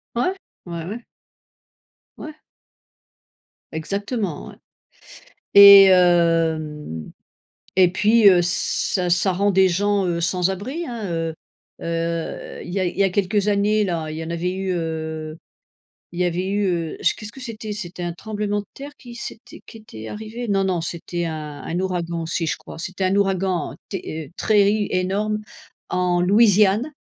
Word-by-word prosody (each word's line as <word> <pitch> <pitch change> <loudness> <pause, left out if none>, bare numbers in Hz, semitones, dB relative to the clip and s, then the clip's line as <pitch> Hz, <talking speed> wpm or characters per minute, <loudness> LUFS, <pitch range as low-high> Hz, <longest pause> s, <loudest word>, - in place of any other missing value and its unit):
Ouais, 365 +11 +1 0.3
ouais, 170 -2 -5
ouais. 225 +5 -7 1.1
Ouais. 310 0 -8 1.4
Exactement, 200 - -3
ouais - - -12 1.0
et 200 -1 +11
hem 165 - +2 0.7
et 180 -2 +5
puis, 210 +3 +4
heu, 180 -2 +5
ça 180 0 +1
ça 175 +3 +3
rend 200 +2 +2
des 190 -1 +4
gens, 200 +2 +1
heu, 170 -1 -1
sans 180 +1 +1
abri, 260 - -4
hein, 235 -3 -6
heu 165 -1 -2 0.5
heu, 165 0 -4
il 175 - -8
y 195 - -1
a 185 - +1
il 175 - -4
y 200 - +3
a 195 - +2
quelques 200 +2 0
années, 210 +1 +2
là, 165 -4 -3
il 155 - -6
y 160 - -5
en 165 - -7
avait 170 +2 -2
eu, 190 -1 -2
heu, 160 -2 -4 0.8
il 175 - -7
y 180 - +2
avait 175 +1 -1
eu, 205 0 0
heu 170 -3 -2 0.2
qu'est-ce 215 -1 -8
que 270 - -13
c'était? 225 -4 -7
C'était 180 -4 -6
un 175 - -2
tremblement 205 +2 -3
de 205 - -7
terre 280 +1 -9
qui 240 -1 -12
s'était, 235 -1 -9
qui 225 - -12
était 110 - -10
arrivé? 220 +2 -6
Non 195 -1 +2
non, 180 -3 0
c'était 170 +1 -4
un 155 -3 -5
un 175 - -3
ouragan 175 -3 -2
aussi 165 +1 -2
je 135 - -1
crois, - - -12
c'était 185 +3 -3
un 185 +1 +1
ouragan 190 -4 0
ter 160 -6 -6
très 205 -2 +3
i 210 -1 -1
énorme 200 +4 -1 0.5
en 180 -1 0
Louisiane 210 +5 +4
185 Hz, 160 wpm, -22 LUFS, 170-205 Hz, 1.4 s, et